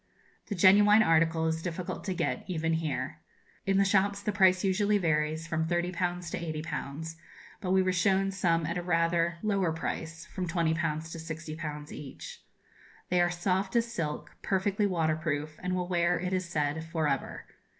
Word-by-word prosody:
The 205 - -3
genuine 205 +4 +7
article 165 -2 +3
is 160 0 0
difficult 180 +2 -4
to 190 -2 -2
get, - - -1
even 165 -2 -1
here. 160 -3 -2 0.5
In 195 0 +3
the 200 - +4
shops 200 0 +2
the 205 +1 -1
price 190 -2 +4
usually 205 +2 +2
varies 160 -2 0
from 160 -1 -1
30_l_. 175 0 -1
to - - -2 0.2
80_l_.; 160 +1 -5 0.5
but 185 - -3
we 190 0 +4
were 185 0 +1
shown 195 +2 +2
some 170 -4 +1
at 170 +3 -2
a - - -3
rather 170 0 +1
lower 195 -5 +1
price 160 +1 -4
from 190 -3 -4
20_l_. 165 -1 +1 0.4
to - - -6
60_l_. 155 -2 -6
each. 145 -3 -9 0.7
They 180 0 +3
are 175 - +3
soft 185 +3 -1
as 235 0 +1
silk, 150 -7 -4
perfectly 200 +2 +1
waterproof, 155 -3 -1
and 180 0 -1
will 180 -1 -1
wear, 175 -1 +2
it 180 +2 -2
is 185 -2 -1
said, 150 -1 -1
for 160 -1 -1
ever. 135 -2 -2
175 Hz, 170 wpm, -29 LUFS, 160-190 Hz, 0.7 s, genuine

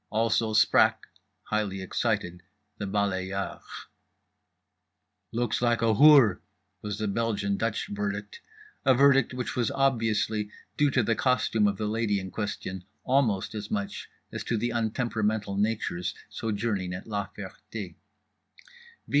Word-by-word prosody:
Also 110 0 +1
sprach, 110 +1 +5 0.5
highly 105 -3 -1
excited, 95 -2 -1 0.4
the 100 - -3
balayeur. 95 -1 -2 1.7
"Looks 120 -1 -1
like 120 -1 +2
a—hoor," 115 -2 +6 0.4
was 105 -1 -4
the 110 0 -2
Belgian 100 -1 0
Dutch 115 +2 -1
verdict, 100 0 -4 0.4
a 130 - +5
verdict 135 -1 +5
which 125 -1 -4
was 120 -3 +1
obviously 110 -5 +1 0.3
due 145 0 +3
to 130 -3 +2
the 115 - +2
costume 115 -3 +2
of 100 -1 -1
the 105 - -2
lady 105 -1 0
in 95 -1 -7
question 95 -2 -4 0.2
almost 120 -7 +1
as 105 -1 -5
much 100 -1 -3 0.2
as - - -5
to 115 - 0
the 120 +3 -1
untemperamental 110 -3 -1
natures 105 -5 -1 0.2
sojourning 105 -4 -2
at 95 - -8
La 105 -2 -3
Ferté. 100 -1 -7
B. - - -32
105 Hz, 130 wpm, -28 LUFS, 100-115 Hz, 1.7 s, a—hoor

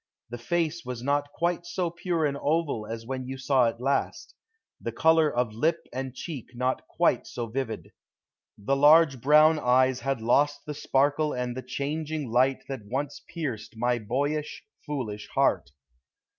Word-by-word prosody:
The 120 - -5
face 165 +6 -1
was 125 -1 -6
not 145 +1 0
quite 170 +2 -1
so 175 -1 -2
pure 170 -2 -1
an 140 -1 0
oval 145 -7 -1
as 115 0 -6
when 130 0 -4
you 135 +1 -5
saw 130 -2 +3
it 115 - -8
last; 135 +3 -1 0.5
the - - -3
color 160 -1 +4
of 120 -2 -1
lip 155 +10 0
and 130 0 -4
cheek 130 -5 -7
not 130 +1 -1
quite - - +1
so 120 - -4
vivid. 115 -1 -4 0.7
The 105 +7 0
large 145 -2 +6
brown 155 +4 +6
eyes 130 0 +3
had 135 -2 -1
lost 140 +6 +2
the 150 - -4
sparkle 145 +2 +1
and 125 -1 -3
the 130 - -4
changing 145 +1 -3
light 130 +3 +2
that 135 -5 -5
once 140 +5 -3
pierced 115 -10 -5
my 120 +1 +1
boyish, 145 +7 -2 0.2
foolish 110 -8 -4
heart. - - +2
135 Hz, 160 wpm, -27 LUFS, 125-150 Hz, 0.7 s, large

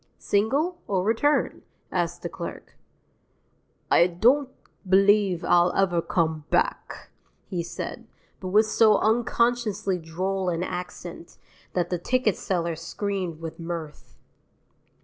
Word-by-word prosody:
"Single, 280 - 0
or 190 -3 0
return?" 230 +8 +1 0.3
asked - - -2
the - - -1
clerk. - - -8 1.2
"I 170 - +6
don't 245 +11 +3 0.4
believe 195 -2 +4
I'll 175 0 +4
ever 175 -3 +2
come 160 -5 -1
back," - - -1 0.3
he 180 -3 -3
said, 170 +7 -6 0.3
but 185 - -6
with 210 +4 +4
so 215 -1 +4
unconsciously 225 -4 +1
droll 185 +3 -2
an 170 0 -1
accent 180 -1 -7 0.4
that 175 -1 -1
the 180 - 0
ticket 245 +2 +1
seller 170 -3 -2
screamed 180 0 -4
with 165 0 -7
mirth. 165 -2 -7
190 Hz, 115 wpm, -25 LUFS, 170-215 Hz, 1.2 s, I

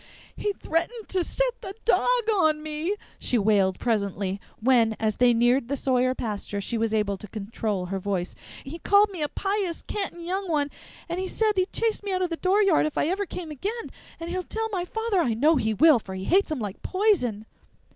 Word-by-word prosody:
"He 415 - -1
threatened 395 +7 -2
to 370 -2 +1
set - - -1
the 385 0 -7
dog 475 - +3 0.3
on 310 -5 +2
me!" 310 +6 -2 0.2
she 245 - +1
wailed 200 -3 +3
presently, 200 -4 -1 0.2
when, 230 -2 +3
as 215 -2 0
they 245 -1 +5
neared 240 +2 +3
the 280 +2 -1
Sawyer 255 -1 +1
pasture, 205 -3 -4
she 200 +4 -3
was 225 -1 0
able 210 -2 0
to 210 - -9
control 205 -2 -3
her 195 +2 -3
voice. 185 -2 -2 0.3
"He 310 +5 -7
called 405 +2 +4
me 360 -5 -6
a 295 - 0
pious, 390 -2 -2
cantin' 385 -4 -4
young 380 +1 -2
one, 290 -3 +1 0.4
and 365 +2 -3
said 440 -1 +2
he'd 370 0 +1
chase 455 -1 0
me 405 -1 -4
out 370 0 0
o' - - +1
the 335 -1 -4
dooryard 380 -3 +3
if 305 - -6
I 300 - +2
ever 395 +2 -1
came 340 -4 -6
again! 415 - -4 0.3
And 335 +1 -5
he'll 370 +1 -1
tell 445 +4 -3
my 360 -3 -1
father 445 0 -1
I 240 -8 +1
know 300 +7 +4
he 220 -3 0
will, 310 0 +6
for 190 -3 -8
he 190 - -5
hates 380 - +3
him 310 - -1
like 205 -5 -5
poison." 345 - +1
305 Hz, 205 wpm, -26 LUFS, -, 0.4 s, will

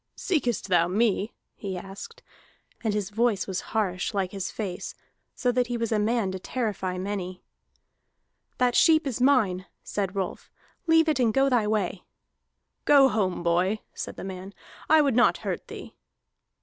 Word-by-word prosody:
"Seekest 275 - -1
thou 175 -3 +3
me?" 210 +2 +1 0.2
he 190 -3 -5
asked. 195 - -9 0.6
And 220 - +1
his 205 -1 -2
voice 225 -2 +1
was 190 -2 -3
harsh, 200 -2 -1
like 190 -2 0
his 195 -2 -4
face, 190 -5 -5 0.4
so 250 - +1
that 245 0 +1
he 240 0 -2
was 230 -1 -2
a 215 - +2
man 215 -2 +1
to 190 - -5
terrify 195 -5 -3
many. 185 -1 -4 1.1
"That 250 -1 +2
sheep 315 -1 +5
is 255 -3 -3
mine," 215 -9 +3 0.2
said 195 -2 -3
Rolf. 190 -2 -4 0.4
"Leave 325 0 +5
it 305 -4 +1
and 235 -3 +3
go 270 +4 +3
thy 240 -5 +2
way." 200 -4 -1 0.8
"Go 280 -2 +7
home, 195 -6 -1
boy!" 180 +5 +2 0.2
said - - -6
the - - -8
man. 190 +1 -7 0.3
"I 315 0 +6
would 275 -5 +1
not 245 - +4
hurt - - -3
thee." - - -9
210 Hz, 160 wpm, -26 LUFS, 190-245 Hz, 1.1 s, Go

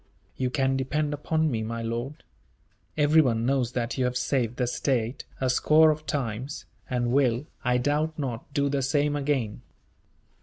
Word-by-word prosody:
"You 130 -1 -1
can 135 +1 +1
depend 145 +3 -1
upon 155 +1 0
me, 115 -2 -1
my 115 +1 -4
lord. 120 +5 -4 0.7
Everyone 145 -7 +4
knows 130 -2 +1
that 120 +1 -2
you 130 - +2
have 125 0 0
saved 125 -2 0
the 125 - +1
state, 125 0 -1
a 130 - 0
score 155 +5 +5
of 155 0 -5
times; 130 0 -3 0.2
and 120 -1 0
will, 130 -1 +2 0.2
I 125 -1 +2
doubt 150 +5 0
not, 130 -3 -4
do 140 0 +1
the 140 0 0
same 145 +2 +1
again." 135 -7 -1
130 Hz, 160 wpm, -26 LUFS, 120-145 Hz, 0.7 s, score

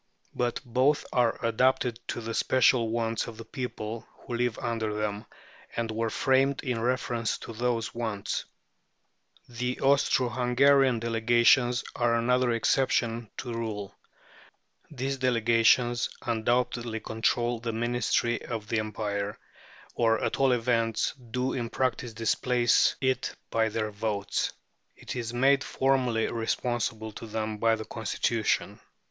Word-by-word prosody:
But 120 -1 -1
both 130 +5 +2
are 120 -2 +2
adapted 120 0 +2
to - - -3
the 115 0 -4
special 125 -1 +3
wants 115 -1 -1
of 115 -2 -8
the 115 - -9
people 115 -3 -5
who - - -7
live 120 -1 0
under 110 -3 -2
them, 105 0 -3 0.5
and 115 -1 -1
were 115 +1 -1
framed 135 +3 +2
in 125 -5 -2
reference 120 -2 -1
to 115 - -9
those 115 0 -1
wants. 110 -4 -3 1.0
The 125 +1 -3
Austro 135 -2 +3
Hungarian 130 +2 +4
Delegations 120 +2 +3
are 120 -1 +2
another 125 +2 +2
exception 115 -1 +1
to 125 - -5
the 115 - -3
rule. 105 -4 -4 1.0
These 135 -1 -3
Delegations 120 -1 +3
undoubtedly 120 0 0
control 115 +2 0
the 115 0 -3
ministry 120 0 0
of 110 -2 -6
the 115 - +1
Empire, 105 -1 -3 0.6
or 115 -1 +2
at - - -1
all 135 -1 +4
events 115 -2 +1 0.2
do 125 +2 -1
in 120 -2 -3
practice 130 -2 -1
displace 120 +2 +2
it 130 -1 0 0.2
by 110 -1 +2
their 110 0 -2
votes. 100 -1 -2 0.5
It - - -7
is 115 -2 -3
made 135 +3 +3
formally 130 -4 +1
responsible 115 -1 -2
to 115 - -9
them 110 -1 -3
by 115 0 +3
the 110 0 -7
Constitution. 115 0 -1
115 Hz, 130 wpm, -28 LUFS, 110-125 Hz, 1.0 s, Hungarian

